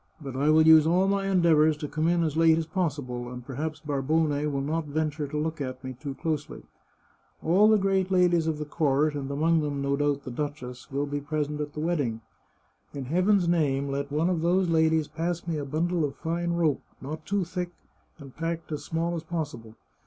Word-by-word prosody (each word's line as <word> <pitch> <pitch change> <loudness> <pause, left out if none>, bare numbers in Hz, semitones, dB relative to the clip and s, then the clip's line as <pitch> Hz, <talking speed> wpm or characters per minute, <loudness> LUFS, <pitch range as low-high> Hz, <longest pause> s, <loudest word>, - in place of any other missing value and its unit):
But 135 -4 -7
I 140 +3 +2
will 155 +1 +6
use 160 -1 +7
all 180 +3 +3
my 195 0 0
endeavours 160 -5 +4
to 150 - -5
come 155 +2 -1
in 170 0 +2
as 155 -2 -1
late 165 0 +5
as 165 - -1
possible, 145 -9 -3
and 125 -1 -8
perhaps 150 +4 -4
Barbone 150 +2 0 0.2
will 140 -1 -1
not 155 +3 -2
venture 150 0 -2
to 150 +2 -4
look 155 0 -2
at 130 -1 -5
me 130 0 -5
too 135 +2 -7
closely. 150 0 -4 0.8
All 195 +6 +5
the 215 - +6
great 195 -1 +1
ladies 175 -3 +3
of 160 -2 0
the 150 - -4
court, 150 0 +1
and 140 -2 -4
among 160 +3 +2
them, 145 -2 -2
no 140 0 0
doubt, 145 -1 0
the 130 - -6
duchess, 125 -3 -5
will 140 +1 -1
be 145 0 -3
present 150 0 -2
at 145 0 -5
the - - -6
wedding. 145 -9 -1 0.7
In 140 -2 -4
Heaven's 180 +5 +2
name, 140 -5 +1
let 140 +1 -3
one 160 +5 +1
of 170 -3 -1
those 180 +2 +2
ladies 160 -1 +3
pass 170 +1 -3
me 165 -2 -2
a 145 - -4
bundle 165 +4 0
of 140 -2 -2
fine 170 +1 -2
rope, 165 -4 +1 0.2
not 155 +3 -6
too 200 -1 +1
thick, 180 0 -4 0.5
and 140 -4 -12
packed 165 0 -4
as 145 -1 -4
small 165 +2 -2
as 165 - -3
possible. 150 -10 -5
155 Hz, 210 wpm, -27 LUFS, 140-170 Hz, 0.8 s, use